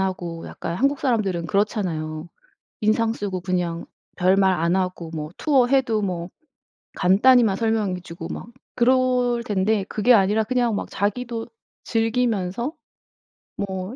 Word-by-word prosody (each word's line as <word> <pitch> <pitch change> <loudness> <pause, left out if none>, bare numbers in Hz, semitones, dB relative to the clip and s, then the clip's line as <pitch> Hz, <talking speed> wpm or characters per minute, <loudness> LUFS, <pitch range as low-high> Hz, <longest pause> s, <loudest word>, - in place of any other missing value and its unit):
하고 175 -3 -3
약간 170 - -5
한국 275 +6 +1
사람들은 200 -10 0
그렇잖아요. 170 -6 -1 0.5
인상 220 +1 +2
쓰고 195 -5 -4
그냥 175 -2 -2 0.3
별말 190 +1 +3
안 170 0 +1
하고 180 -3 -2
뭐 150 -1 -4
투어 275 -5 +3
해도 250 -5 +2
뭐 175 -3 -3 0.7
간단히만 210 +3 +4
설명해 215 -4 0
주고 165 -1 -8
막 - - -7 0.3
그럴 250 -1 +2
텐데 205 -1 +1
그게 230 +4 +3
아니라 210 +1 +3
그냥 240 -1 +1
막 - - -4
자기도 225 +3 -2 0.4
즐기면서 225 0 0 0.9
뭐 190 +2 -4
205 Hz, 265 characters per minute, -23 LUFS, 180-235 Hz, 0.9 s, 간단히만